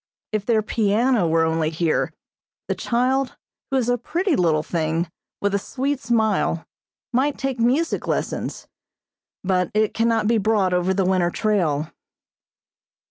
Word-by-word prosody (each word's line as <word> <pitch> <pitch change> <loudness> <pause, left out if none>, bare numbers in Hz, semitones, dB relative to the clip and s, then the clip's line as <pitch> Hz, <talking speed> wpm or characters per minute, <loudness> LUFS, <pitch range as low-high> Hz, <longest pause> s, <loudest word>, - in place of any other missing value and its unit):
If 215 -2 -2
their 220 -3 +3
piano 220 -1 +2
were 165 0 +3
only 160 -1 +1
here, 160 0 0 0.6
the - - +1
child, 255 +2 0 0.3
who 270 - +1
is 245 -3 +1
a 245 0 +1
pretty 340 - 0
little 160 -6 +2
thing, 165 +1 -1 0.4
with 200 0 +1
a 200 - +2
sweet 275 +6 -2
smile, 220 -8 +1 0.5
might 270 +4 +1
take 270 -2 -2
music 265 +8 +1
lessons, - - -2 0.8
but 185 -2 +1
it 215 0 +2
cannot 225 -1 +1
be 230 0 +3
brought 200 -3 +2
over 180 +1 +1
the 190 0 +1
winter 185 -2 +2
trail. 175 -8 0
215 Hz, 140 wpm, -22 LUFS, 180-245 Hz, 0.8 s, their